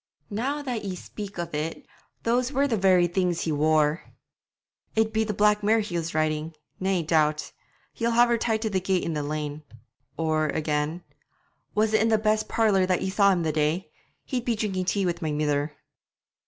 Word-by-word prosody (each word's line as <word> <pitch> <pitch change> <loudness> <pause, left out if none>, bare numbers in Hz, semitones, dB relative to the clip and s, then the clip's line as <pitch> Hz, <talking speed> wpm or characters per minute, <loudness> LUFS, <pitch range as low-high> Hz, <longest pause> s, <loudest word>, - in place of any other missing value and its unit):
'Now 270 +8 -2
that 245 -6 -3
ye 190 -2 -3
speak 205 +1 -8
of 170 -1 -4
it, 155 +2 -3 0.4
those 245 +3 +1
were 280 0 +2
the 240 - 0
very 185 -3 +4
things 175 -1 0
he 160 - -1
wore.' 155 +1 +2 0.9
'It'd 220 0 +2
be 220 0 +2
the 215 - -2
black 210 +1 +3
mare 220 +2 +3
he 205 -4 -5
was 165 -1 -3
riding, 155 +1 -1 0.2
nae 190 -2 0
doubt; 155 -1 +1 0.4
he'll 230 0 -1
have 240 +1 +4
tied 230 0 0
her - - +2
to 220 - 0
the 190 - +1
gate 190 -1 0
in 165 - -2
the 150 - -1
lane.' 150 0 -4 0.6
Or 155 -1 +1
again: 150 +2 -1 0.7
'Was 215 +1 +2
it 220 - +4
in 220 - +3
the 220 - +4
best 215 0 +1
parlour 200 -5 +3
that 185 -1 +1
ye 190 - -1
saw 200 0 +4
him 175 -3 +1
the 160 - +1
day? 155 +4 0 0.3
He'd 250 -4 -2
be 235 -1 0
drinking 195 -4 -2
tea 195 +1 +1
wi' 175 - +1
my 155 -2 -1
mither.' 150 0 0
185 Hz, 195 wpm, -26 LUFS, 155-215 Hz, 0.9 s, very